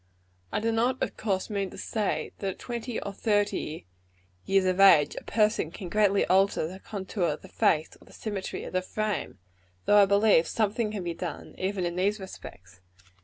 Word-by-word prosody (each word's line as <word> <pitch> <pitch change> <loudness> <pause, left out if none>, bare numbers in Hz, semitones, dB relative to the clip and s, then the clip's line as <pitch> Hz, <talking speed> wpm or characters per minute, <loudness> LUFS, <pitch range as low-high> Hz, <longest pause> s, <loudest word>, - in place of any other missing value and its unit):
I - - 0
do 225 +1 0
not, 240 +3 +1
of - - -3
course, 195 -4 -1
mean 200 -2 -1
to - - -12
say, 215 -3 -2
that 195 - -2
at - - -22
twenty 240 -1 -4
or 200 - -6
thirty 205 - -1 0.6
years 195 -1 +3
of 185 0 +1
age 190 -7 +6
a - - -7
person 210 -6 +1
can 175 +2 -8
greatly 200 0 +3
alter 190 -2 +3
the 185 +3 -9
contour 195 -2 -3
of 155 -2 -2
the - - -10
face, 155 +1 +2
or - - -17
the - - -18
symmetry 205 -3 -5
of - - -8
the 185 - +1
frame; 215 +2 -3 0.5
though 205 0 +6
I 200 - +5
believe 200 -4 +4
some 215 -2 0
thing 230 -2 -1
can 210 -3 -4
be 170 -1 -3
done, 165 -2 -6
even 190 -1 -1
in 175 0 -3
these 205 +3 +1
respects. 90 - -11
195 Hz, 200 wpm, -28 LUFS, 185-215 Hz, 0.6 s, age